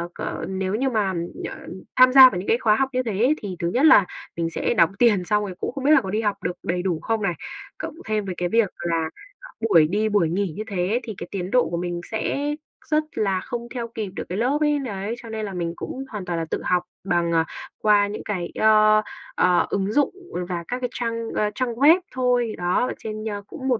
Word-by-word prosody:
ờ, - - -4
nếu 190 +1 -2
như 265 +4 +1
mà, 210 -6 0 0.4
ờ, - - -8 0.4
tham 255 0 +7
gia 265 -1 +11
vào 180 - -4
những 185 - -7
cái 230 - +3
khóa 220 -4 +3
học 265 +3 +1
như 255 0 +1
thế 225 - -2
ấy, 255 +7 +4
thì 195 -3 -5
thứ 170 - -1
nhất 265 +5 +3
là 260 - +7 0.3
mình 165 -1 -1
sẽ 165 - -1
đóng 170 -6 +4
tiền 215 -6 +4
xong 210 +2 +1
rồi 185 -3 -5
cũng - - -2
không 270 0 -6
biết 290 - +4
là 310 - +7
có 190 - -6
đi 215 +3 0
học 205 -2 -2
được 180 - -1
đầy 180 +1 -1
đủ 175 -4 -1
không 225 -1 -1
này. 180 -4 0 0.4
Cộng - - -6
thêm 215 -2 -1
với 185 -2 -4
cái 175 0 -1
việc 230 -3 +3
là, 165 -2 -1 0.3
ờ, - - -11 0.2
buổi 160 -5 +6
đi 215 +4 0
buổi 200 -6 +2
nghỉ 185 -1 -1
như 215 - -3
thế 200 +4 0
thì 220 - -6
cái - - -7
tiến 185 -1 -4
độ 250 -1 +3
của 170 - -2
mình 175 0 -3
sẽ 220 +4 -1 0.5
rất 305 0 +3
là 195 -3 +1
không 235 +2 -5
theo 235 -2 -3
kịp 220 -4 -5
được - - -3
cái 180 - -3
lớp 255 +6 +1
ấy. 295 -1 +2
Đấy, 215 -3 -4
cho 230 - -9
nên 220 -1 -4
là 200 - -6
mình 170 -2 -3
cũng 265 - -6
hoàn 210 -4 -6
toàn 170 -2 -2
là 165 - -2
tự - - -1
học 180 -1 +2 0.2
bằng, 175 -2 +1
à, 165 0 +3 0.4
qua 205 -1 +4
những 205 - -6
cái, 185 -5 -3
ơ, 215 0 +5 0.3
ờ, 180 -1 +3
ứng 195 +1 -1
dụng 290 +3 +2 0.4
và 175 -1 -3
các 250 - -3
cái 250 -1 -2
trang, 230 -1 -3
ơ, 210 -1 +1
trang 255 -2 -1
web 295 +9 +6
thôi, 245 -3 +1
đó, 180 +8 +1
ở - - -3
trên, 215 0 -6
ơ, 205 -1 -4
cũng 265 -1 -7
một 250 -4 +2
210 Hz, 250 wpm, -23 LUFS, 180-240 Hz, 0.5 s, gia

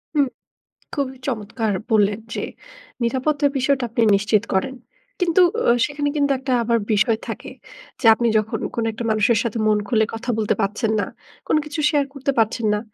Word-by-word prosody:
হুম। 285 -2 +4 0.7
খুবই 265 -2 -2
চমৎকার 220 -2 -2 0.2
বললেন 210 -1 +3
যে, - - -3 0.6
নিরাপত্তার 280 +4 +1
বিষয়টা 270 0 +1
আপনি 230 +1 -1
নিশ্চিত 205 +2 +2
করেন। 190 +8 0 0.4
কিন্তু 360 0 +3 0.3
অ - - +5 0.2
সেখানে 290 0 -2
কিন্তু 285 -1 +2
একটা 265 0 -2
আবার 230 0 +2 0.2
বিষয় 220 +2 +3
থাকে। - - -6 0.5
যে 245 - -3
আপনি 235 +2 0
যখন 215 0 -1 0.2
কোনো 230 - -1
একটা 225 +2 -6
মানুষের 215 +1 +3
সাথে 230 -1 -3
মন 215 - +4
খুলে 220 -1 +2
কথা 225 +2 -6
বলতে 215 -2 +1
পারছেন 210 +3 0
না, - - 0 0.4
কোন - - +2
কিছু 300 +1 -5
শেয়ার 290 -3 +2
করতে 275 0 -1
পারছেন 225 +1 +1
না। 210 - 0
235 Hz, 170 wpm, -21 LUFS, 215-275 Hz, 0.7 s, অ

